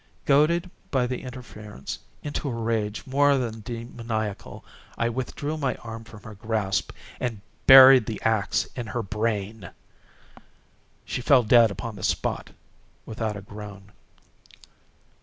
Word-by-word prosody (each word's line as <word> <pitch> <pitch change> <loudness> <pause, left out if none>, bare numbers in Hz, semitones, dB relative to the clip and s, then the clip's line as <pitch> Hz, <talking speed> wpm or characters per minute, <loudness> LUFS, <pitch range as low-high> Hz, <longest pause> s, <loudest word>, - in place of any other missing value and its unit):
Goaded, 170 +5 +3 0.2
by 130 -2 +1
the 125 0 -3
interference, 110 - -8 0.2
into 145 -1 -3
a 120 - -3
rage 110 -2 -2
more 140 +1 +3
than 115 -3 -3
demoniacal, 115 -2 -5 0.3
I 115 - +1
withdrew 130 +5 -4
my 135 -4 -1
arm 115 -1 -9
from 105 -3 -13
her 110 - -9
grasp 105 -2 -2 0.3
and 115 -4 -3 0.3
buried 130 -3 +10
the 110 - -4
axe 110 -3 +1
in 120 -3 -5
her 120 +1 -3
brain. 105 -2 -3 1.4
She - - -3
fell 130 0 +5
dead 115 0 +6
upon 110 +1 -6
the 90 - -9
spot, - - -1 0.6
without 110 -1 -3
a - - -8
groan. 105 -1 -10
115 Hz, 130 wpm, -25 LUFS, 105-130 Hz, 1.4 s, buried